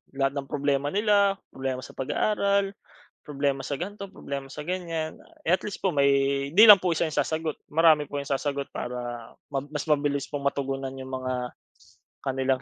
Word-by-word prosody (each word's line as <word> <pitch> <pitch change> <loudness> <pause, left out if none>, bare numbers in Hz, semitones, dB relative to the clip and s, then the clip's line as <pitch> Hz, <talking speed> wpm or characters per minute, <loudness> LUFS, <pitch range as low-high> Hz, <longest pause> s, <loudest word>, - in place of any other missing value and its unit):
Lahat 135 0 +1
ng 135 -1 -4
problema 145 0 0
nila, 200 -1 +3 0.2
problema 130 -1 -3
sa - - -10
pag-aaral, 200 +7 +1 0.6
problema 140 -1 -1
sa 140 - -2
gan'to, 200 +6 -6
problema 140 -1 -6
sa 150 - -8
ganyan, 165 -2 -3 0.2
eh, 165 - 0
at 185 - +3
least 205 - -6
po 190 - +3
may 140 -1 +2
hindi 205 +5 +8
lang 205 -2 +12
po 180 -2 0
isa - - +1
'yong 155 - -6
sasagot, 160 +1 -1
marami 155 -2 +4
po 145 - -5
'yong 140 - -9
sasagot 140 0 -1
para, 120 -1 -5 0.2
mas 145 +1 -3
mabilis 145 -2 +1
pong 140 -1 -1
matugunan 135 -1 -2
'yong 130 0 -8
mga 130 0 -3 0.9
kanilang 130 0 0
140 Hz, 170 wpm, -26 LUFS, 135-165 Hz, 0.9 s, lang